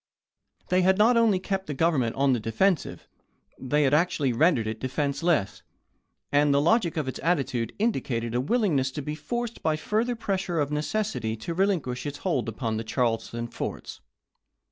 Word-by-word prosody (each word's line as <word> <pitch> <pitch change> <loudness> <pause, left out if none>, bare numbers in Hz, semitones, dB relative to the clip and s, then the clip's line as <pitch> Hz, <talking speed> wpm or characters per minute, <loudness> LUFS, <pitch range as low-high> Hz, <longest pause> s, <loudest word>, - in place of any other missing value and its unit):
They 185 0 +3
had 190 +1 +3
not 225 +4 +5
only 225 -4 +4
kept 190 +1 -3
the 145 - -4
Government 135 -7 +1
on 135 -1 +3
the 120 - 0
defensive; 145 - 0 0.5
they 145 +3 +1
had 135 0 +2
actually 150 -5 +2
rendered 130 -2 +3
it 110 0 -4
defenseless, 140 - -1 0.7
and 145 0 +4
the 140 - +4
logic 170 +1 +2
of 150 -4 -1
its 130 - -4
attitude 135 -8 0
indicated 120 - -1
a 120 - +1
willingness 155 - +1
to 150 - -4
be 150 - -4
forced 240 +8 -4
by 155 - +1
further 220 +9 -1
pressure 190 -6 -2
of 145 -1 0
necessity 150 - -2
to 170 +10 -5
relinquish 165 -9 0
its 145 0 -5
hold 135 -11 -1
upon 110 0 -3
the 110 - -3
Charleston 115 0 -1
forts. - - -6
150 Hz, 165 wpm, -26 LUFS, 125-190 Hz, 0.7 s, not